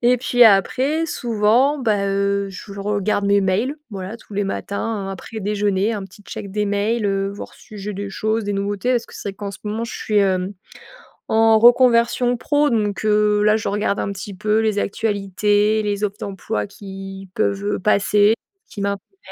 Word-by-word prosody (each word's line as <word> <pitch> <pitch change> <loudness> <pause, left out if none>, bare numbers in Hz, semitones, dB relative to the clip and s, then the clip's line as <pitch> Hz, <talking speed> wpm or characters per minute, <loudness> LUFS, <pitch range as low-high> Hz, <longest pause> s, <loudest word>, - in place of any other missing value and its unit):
et 245 +1 +4
puis 245 0 +4
après, 260 +9 +3
souvent, 240 +3 +2
bah 210 -5 +1
heu, 200 0 0
je 195 +2 -10
regarde 205 0 0
mes 200 0 +4
mails, 200 +8 0 0.2
voilà 195 +1 -6
tous 215 - -14
les 205 +1 0
matins, 200 +1 -3
heu, - - -4
après 205 +4 -7
déjeuner 205 +1 0
un 205 -2 -4
petit 205 +2 -15
check 200 -1 -8
des 210 +1 0
mails, 205 +3 0
heu, 195 0 0
voir 200 - -9
si 215 -3 -14
j'ai 205 +1 -5
des 200 +1 -5
choses, 215 +2 -1
des 205 - -2
nouveautés, 200 +3 -1
parce 240 -1 +1
que - - -15
c'est 200 - -4
vrai - - -14
qu'en 200 0 -6
ce 195 - -10
moment 215 +2 -3
je 230 - -5
suis, 210 -1 0
hem, 190 -1 +1 0.8
en 225 0 +5
reconversion 240 +1 +4
pro, 290 +3 +2
donc 210 -3 -1
heu, 210 -1 +3
là 210 +1 +4
je 220 - -3
regarde 205 0 0
un - - -2
petit 200 +1 -7
peu 210 +3 +1
les 215 -2 0
actualités, 205 +1 +1
les 205 -1 -2
offres 205 -1 -1
d'emploi 195 - -3
qui 195 - -9
peuvent, 200 -2 0
heu, - - -2
passer, 205 +1 +3 0.4
qui 205 - -8
m'intéressent. 200 - -4
205 Hz, 195 wpm, -21 LUFS, 200-225 Hz, 0.8 s, en